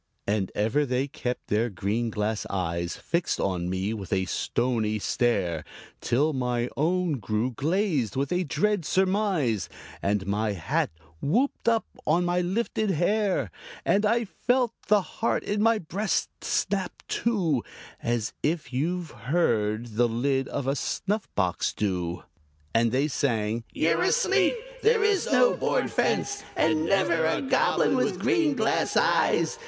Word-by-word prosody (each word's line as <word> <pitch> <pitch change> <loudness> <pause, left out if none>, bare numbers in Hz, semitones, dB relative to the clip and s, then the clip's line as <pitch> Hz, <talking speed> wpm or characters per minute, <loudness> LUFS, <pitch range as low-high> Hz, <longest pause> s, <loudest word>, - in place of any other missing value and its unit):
And 100 -2 0
ever 110 +8 +2
they 130 0 0
kept 125 -3 -4
their 110 +3 +1
green 105 +4 -1
glass 105 0 -2
eyes 85 -2 -2
Fixed 170 0 -1
on 90 -2 -1
me 95 +3 -1
with 100 -5 -7
a 95 -1 +1
stony 115 +1 0
stare 100 -7 0 0.4
Till 150 +6 +1
my 125 -2 -1
own 170 -1 +1
grew 110 +4 -1
glazed 150 - 0
with 135 +1 -1
a 180 +1 +1
dread 205 +4 0
surmise, 185 - +1 0.3
And 100 -1 0
my 105 +2 0
hat 85 -5 -1 0.3
whooped 235 - +1
up 225 -1 +2 0.2
on 170 +3 +3
my 175 0 +1
lifted 215 +3 -1
hair, 185 - +1 0.3
And 205 - +3
I 230 +2 +2
felt 245 +3 0
the 210 -2 +4
heart 225 - -1
in 205 0 -1
my 225 +1 +4
breast 195 +3 -1
snap 195 -2 -1
to 180 - +1 0.4
As 120 -2 -1
you've 160 +2 -1
heard 115 -4 0
the 120 0 +4
lid 130 +3 0
of 140 - -3
a 135 +1 +1
snuff 200 +8 -2
box 90 -4 0
do. 90 -4 -2 0.5
And 115 0 +3
they 135 +4 +2
sang, 115 -5 -1
"You're 165 +1 +1
asleep! - - +3 0.3
There 445 0 +4
is 415 -3 +2
no - - +4
board - - 0
fence, 410 - 0
And 160 0 +2
never 170 -4 +2
a 160 - +1
Goblin 265 - +2
with - - +1
green 325 -6 +2
glass 220 -3 +1
eyes! 470 - +2
140 Hz, 145 wpm, -26 LUFS, -, 0.5 s, the